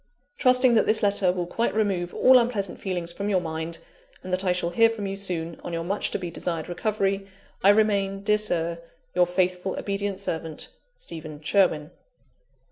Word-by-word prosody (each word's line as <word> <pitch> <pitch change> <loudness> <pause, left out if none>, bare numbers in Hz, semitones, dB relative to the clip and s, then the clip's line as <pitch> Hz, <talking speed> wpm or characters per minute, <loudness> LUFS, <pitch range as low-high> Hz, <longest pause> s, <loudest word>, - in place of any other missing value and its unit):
"Trusting 255 -1 +5
that 225 - +3
this 215 - +4
letter 200 -2 +3
will 180 -1 -2
quite 230 +7 -1
remove 190 -5 0
all 255 0 +6
unpleasant 215 -6 -1
feelings 175 -3 -2
from 200 +3 -3
your 190 -3 +3
mind, 160 0 -4 0.5
and 185 - -5
that 185 +1 0
I 185 - +2
shall 180 -1 0
hear 230 +5 +5
from 220 -3 -5
you 195 0 -3
soon, 170 -4 -3
on 175 - -6
your 165 0 -2
much 195 +4 -1
to - - -2
be 175 -3 -6
desired 165 -1 -3
recovery, 195 +1 -1 0.4
"I 195 - +7
remain, 200 -2 +2
dear 210 +1 +3
Sir, 170 -5 0 0.3
"Your 180 0 +3
faithful, 180 +1 -1
obedient 200 -1 -2
servant, 165 -5 -4 0.3
"STEPHEN 155 -3 -7
SHERWIN. 160 -3 +2
190 Hz, 180 wpm, -25 LUFS, 170-205 Hz, 0.5 s, I